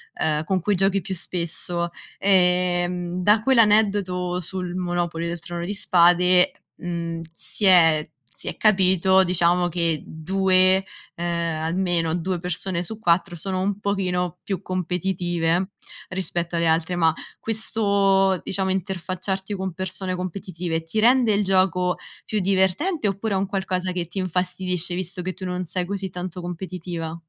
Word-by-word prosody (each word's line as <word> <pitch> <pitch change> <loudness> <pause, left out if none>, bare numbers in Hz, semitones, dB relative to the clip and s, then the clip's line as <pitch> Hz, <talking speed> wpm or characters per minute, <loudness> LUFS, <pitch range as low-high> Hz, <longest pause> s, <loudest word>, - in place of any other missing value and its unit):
ehm, 155 0 0
con 190 +2 0
cui 205 +3 0
giochi 195 +1 +2
più 190 +1 -5
spesso, 170 0 -2 0.3
ehm, 180 -1 +2
da 210 +2 +4
quell'aneddoto 205 -7 +2
sul 180 +1 -4
Monopoly 175 -2 -2
del 170 0 -4
Trono 170 +1 -6
di 200 +4 -3
Spade, 180 -1 +4 0.2
mhmm, 170 -1 -4
si 210 - -5
è 165 -5 +5 0.3
si - - -8
è - - -3
capito, 190 -2 +4
diciamo, 175 0 +2
che 170 -2 -1
2, 185 +3 +2 0.3
ehm, 170 -2 -2
almeno 170 -1 0
2 175 +1 -2
persone 180 0 -2
su 220 +4 -5
4 175 -3 +2
sono 185 +3 -2
un 200 +1 -1
pochino 180 -4 -1
più 195 -2 -3
competitive 180 -1 -1 0.4
rispetto 175 -2 -2
alle 170 0 +1
altre, 160 +2 +1
ma 165 -2 +3 0.3
questo, 200 -4 +2
diciamo, 190 0 -1
interfacciarti 190 +1 -3
con 190 -2 -4
persone 185 0 -3
competitive 180 -2 -4
ti 190 +7 -3
rende 240 -1 +4
il 205 +1 +2
gioco 185 -2 +2 0.3
più 215 - 0
divertente 195 - +1
oppure 200 +2 -2
è - - +2
un 195 0 -1
qualcosa 185 -2 -2
che 175 -1 -2
ti 175 +4 -6
infastidisce 180 -1 -1
visto 180 0 -2
che 185 0 -3
tu 190 - -11
non 180 0 -3
sei 180 +2 -2
così 195 -1 -4
tanto 180 0 -6
competitiva? 175 -2 -5
180 Hz, 145 wpm, -23 LUFS, 175-190 Hz, 0.4 s, è